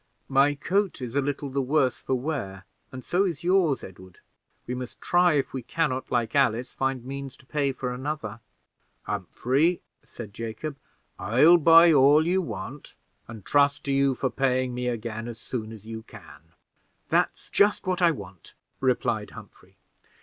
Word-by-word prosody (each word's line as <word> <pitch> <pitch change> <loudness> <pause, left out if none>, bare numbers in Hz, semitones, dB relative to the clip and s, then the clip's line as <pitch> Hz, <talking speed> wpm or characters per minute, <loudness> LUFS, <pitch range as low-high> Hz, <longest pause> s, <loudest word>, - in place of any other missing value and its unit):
"My 140 +2 +4
coat 195 +6 -1
is 125 -3 -6
a 140 - +2
little 140 0 -3
the 140 +1 0
worse 135 -1 +1
for 130 - -2
wear, 120 -9 -4 0.3
and 130 0 -9
so 180 +3 +2
is 170 -4 -3
yours, 175 -6 +2
Edward. 95 -1 -12 0.5
We 125 - -4
must 125 -1 -7
try 175 -1 +3
if 140 -3 -1
we 130 - -3
can 160 +4 -1
not, 130 +1 -4
like 120 -2 0
Alice, 125 -3 +1
find 135 -2 -2
means 135 0 -7
to - - -21
pay 140 0 0
for 125 -1 -4
another." 125 -4 -5 0.6
"Humphrey," 130 - 0 0.2
said 110 -4 -10
Jacob, 115 +7 -5 0.4
"I'll 130 - +5
buy 165 +1 +7
all 145 +3 +5
you 185 +2 +2
want, 115 - -7 0.3
and 110 -3 -10
trust 145 0 +2
to 140 - -1
you 135 -1 +2
for 130 0 -2
paying 130 0 0
me 125 0 -3
again 115 -1 -4
as 115 -1 -8
soon 115 -2 -5
as 110 -2 -11
you 110 0 -7
can." 80 -6 -15 0.6
"That's - - 0
just 205 0 +3
what 185 0 -1
I 175 - +6
want," 95 - -8 0.2
replied - - 0
Humphrey. - - -15
130 Hz, 170 wpm, -26 LUFS, 115-150 Hz, 0.6 s, buy